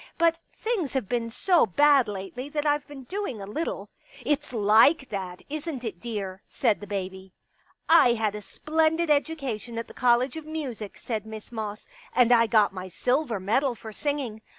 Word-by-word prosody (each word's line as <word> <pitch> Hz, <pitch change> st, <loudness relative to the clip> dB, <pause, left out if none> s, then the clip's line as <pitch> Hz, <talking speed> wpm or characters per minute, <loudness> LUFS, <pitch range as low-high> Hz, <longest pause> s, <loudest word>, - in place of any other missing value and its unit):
But 335 Hz, -1 st, +3 dB, 0.2 s
things 430 Hz, -, -1 dB
have 265 Hz, -7 st, -1 dB
been 235 Hz, 0 st, -1 dB
so 340 Hz, +4 st, +3 dB
bad 280 Hz, +5 st, +5 dB
lately 210 Hz, +7 st, -6 dB
that 295 Hz, 0 st, -2 dB
I've 295 Hz, -1 st, +1 dB
been 285 Hz, -3 st, -10 dB
doing 370 Hz, -, -4 dB
a 195 Hz, -, -6 dB
little." 210 Hz, -3 st, -4 dB, 0.2 s
" 275 Hz, -3 st, -18 dB
It's 290 Hz, +1 st, 0 dB
like 230 Hz, +6 st, +4 dB
that, 185 Hz, -3 st, -5 dB
isn't 300 Hz, -3 st, -5 dB
it, 215 Hz, -7 st, -5 dB
dear? 200 Hz, -5 st, -5 dB
" -, -, -43 dB
said 225 Hz, -5 st, +3 dB
the 205 Hz, -, -9 dB
baby. 190 Hz, -1 st, -5 dB, 0.3 s
" -, -, -37 dB
I 320 Hz, -7 st, +6 dB
had 220 Hz, -3 st, 0 dB
a 210 Hz, -, -6 dB
splendid 320 Hz, +7 st, 0 dB
education 275 Hz, -7 st, -1 dB
at 230 Hz, -, -4 dB
the -, -, -12 dB
College 250 Hz, +3 st, +2 dB
of 315 Hz, -, -7 dB
Music," 260 Hz, -10 st, -5 dB
said 220 Hz, -3 st, -4 dB
Miss 220 Hz, 0 st, -9 dB
Moss, 215 Hz, -2 st, -5 dB, 0.2 s
" -, -, -23 dB
and 245 Hz, -1 st, +5 dB
I 230 Hz, -1 st, +6 dB
got 215 Hz, -3 st, +4 dB
my 185 Hz, -1 st, -6 dB
silver 245 Hz, -, 0 dB
medal 240 Hz, +7 st, +1 dB
for 220 Hz, 0 st, -9 dB
singing. 265 Hz, -4 st, -3 dB
240 Hz, 195 wpm, -26 LUFS, 210-295 Hz, 0.3 s, I